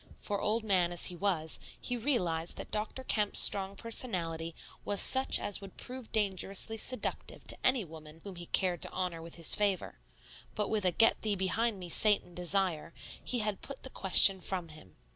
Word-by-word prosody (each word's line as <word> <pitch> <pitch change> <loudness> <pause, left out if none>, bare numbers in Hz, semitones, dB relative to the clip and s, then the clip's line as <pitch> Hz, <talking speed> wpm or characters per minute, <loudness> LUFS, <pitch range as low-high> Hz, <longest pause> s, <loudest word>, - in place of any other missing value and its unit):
For 205 -1 -5
old 220 +2 -1
man 185 -5 +1
as 175 - +1
he 180 - -1
was, 170 -4 -1 0.2
he 250 - -5
realized 180 - -2
that - - -9
Dr. 215 +5 -5
Kemp's 210 -5 0
strong 195 -1 +6
personality 170 -8 -1 0.3
was 205 -1 -2
such 265 0 +3
as 205 - -2
would 195 -1 -13
prove 255 -2 -10
dangerously 200 0 0
seductive 255 +3 -3
to - - -5
any 255 -5 +2
woman 155 -1 -13
whom 200 -2 -9
he 175 -1 -10
cared 180 -3 -1
to - - -3
honor 180 -3 -4
with 165 0 -11
his 165 -2 +4
favor; 195 - -2 0.6
but 210 -1 -2
with 210 -3 -1
a 180 - +2
"Get 225 +6 +2
thee 210 -2 -2
behind 205 +4 -1
me, 180 -2 -9
Satan" 200 0 +3
desire, 180 -2 -1 0.3
he 245 -2 -2
had 210 -2 -4
put 275 -1 -10
the 265 - -9
question 190 0 +7
from 180 -2 -5
him. 155 -12 -16
195 Hz, 185 wpm, -30 LUFS, 175-215 Hz, 0.6 s, question